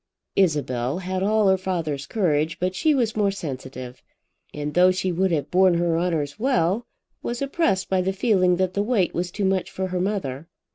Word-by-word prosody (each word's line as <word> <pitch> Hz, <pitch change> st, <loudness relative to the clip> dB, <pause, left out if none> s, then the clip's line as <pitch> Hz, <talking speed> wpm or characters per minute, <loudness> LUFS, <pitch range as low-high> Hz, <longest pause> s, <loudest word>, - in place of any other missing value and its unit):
Isabel 145 Hz, -7 st, +1 dB
had 185 Hz, 0 st, -3 dB
all 210 Hz, +1 st, +3 dB
her 190 Hz, 0 st, +3 dB
father's 160 Hz, -7 st, -3 dB
courage, 160 Hz, -6 st, 0 dB
but 185 Hz, +1 st, 0 dB
she 300 Hz, +11 st, +2 dB
was 235 Hz, -4 st, 0 dB
more 205 Hz, -2 st, +2 dB
sensitive; 130 Hz, -8 st, -7 dB, 0.5 s
and 150 Hz, 0 st, -4 dB
though 180 Hz, +2 st, +6 dB
she 185 Hz, 0 st, 0 dB
would 190 Hz, +2 st, +1 dB
have 150 Hz, -4 st, -1 dB
borne 185 Hz, -1 st, +4 dB
her 170 Hz, -1 st, +1 dB
honours 165 Hz, -2 st, -1 dB
well, 220 Hz, -2 st, +1 dB, 0.3 s
was 240 Hz, 0 st, -3 dB
oppressed 275 Hz, -, 0 dB
by 190 Hz, -1 st, +1 dB
the 190 Hz, +1 st, 0 dB
feeling 190 Hz, -3 st, +2 dB
that 185 Hz, 0 st, 0 dB
the 200 Hz, -, 0 dB
weight 205 Hz, -4 st, +1 dB
was 175 Hz, +1 st, -2 dB
too 200 Hz, +2 st, -2 dB
much 190 Hz, -1 st, 0 dB
for 190 Hz, 0 st, -4 dB
her 180 Hz, 0 st, -1 dB
mother. 165 Hz, -8 st, -3 dB
185 Hz, 190 wpm, -24 LUFS, 165-195 Hz, 0.5 s, though